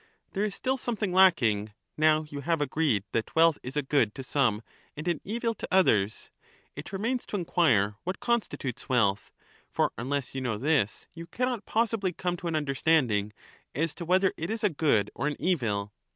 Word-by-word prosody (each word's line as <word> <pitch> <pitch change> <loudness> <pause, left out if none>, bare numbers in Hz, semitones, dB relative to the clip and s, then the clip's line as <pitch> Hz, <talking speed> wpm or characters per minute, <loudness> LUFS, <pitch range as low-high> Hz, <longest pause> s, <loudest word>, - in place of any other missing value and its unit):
There 200 - -1
is 210 -2 -2
still 265 +1 -1
something 220 -7 -2
lacking, 115 - +4 0.2
now 155 0 +3
you 145 -2 -8
have 165 +2 0
agreed 145 -7 +1
that 115 - -2
[wealth] 165 -1 +5
is 130 +4 -6
a 150 - +1
good 135 -6 +1
to 135 - -6
some 125 -5 +1 0.3
and 155 +4 -5
an 170 -3 0
evil 230 +3 -2
to - - -7
others. 110 - +2 0.4
It - - -8
remains 230 +6 -1
to - - -4
enquire 125 - +2
what 185 +3 -4
constitutes 235 - -2
wealth; 105 -6 +1 0.4
for - - +1
unless 135 +1 -2
you 135 - -3
know 120 -4 -1
this, 135 -4 0
you 165 0 -9
cannot 245 +3 -2
possibly 225 -4 0
come 180 +1 -2
to 175 - -6
an 165 - -1
understanding 135 -8 +1 0.4
as 160 +3 0
to 175 - -7
whether 185 +3 +2
it 165 +3 -4
is 225 0 -3
a 210 - +4
good 140 -10 +1
or 145 - -2
an 150 - -1
evil. 105 - -1
155 Hz, 185 wpm, -28 LUFS, 125-190 Hz, 0.4 s, wealth